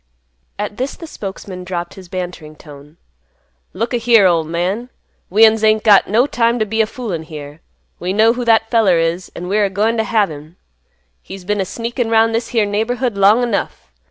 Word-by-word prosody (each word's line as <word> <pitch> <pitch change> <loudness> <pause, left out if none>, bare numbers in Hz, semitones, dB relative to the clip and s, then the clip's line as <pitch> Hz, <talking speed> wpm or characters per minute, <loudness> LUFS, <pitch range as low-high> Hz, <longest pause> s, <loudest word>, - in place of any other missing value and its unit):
At 205 - -5
this 260 +2 -3
the 335 - -10
spokesman 195 - -8
dropped 175 -1 -5
his 185 -2 -13
bantering 175 -4 -6
tone, 150 +1 -15 0.7
"Look 230 +6 -3
a - - +2
here, 230 -3 +4
ol' 170 -3 +3
man. 180 +9 -3 0.4
We'uns 220 +2 +4
ain't 215 0 +3
got 205 -3 +5
no 230 +5 +3
time 235 -3 +1
t' 215 - 0
be 220 +2 0
a 220 - +1
foolin' 215 -9 -5
here. 150 -1 -10 0.4
We 180 +1 -3
know 220 +3 +4
who 245 0 -4
that 225 -1 +3
feller 215 -7 +3
is, 165 +2 -1
an' 180 - -6
we're 205 +2 +2
a - - -1
goin' 215 +4 0
t' 220 - +1
have 215 -5 +1
him. 155 +3 -11 0.7
He's 185 - -10
been 205 +1 0
a - - -1
sneakin' 235 +4 -3
'round 225 0 +3
this 230 +1 -1
here 225 -3 +1
neighborhood 225 +3 -1
long 205 +5 +4
enough. 200 - -3
205 Hz, 195 wpm, -17 LUFS, 180-225 Hz, 0.7 s, got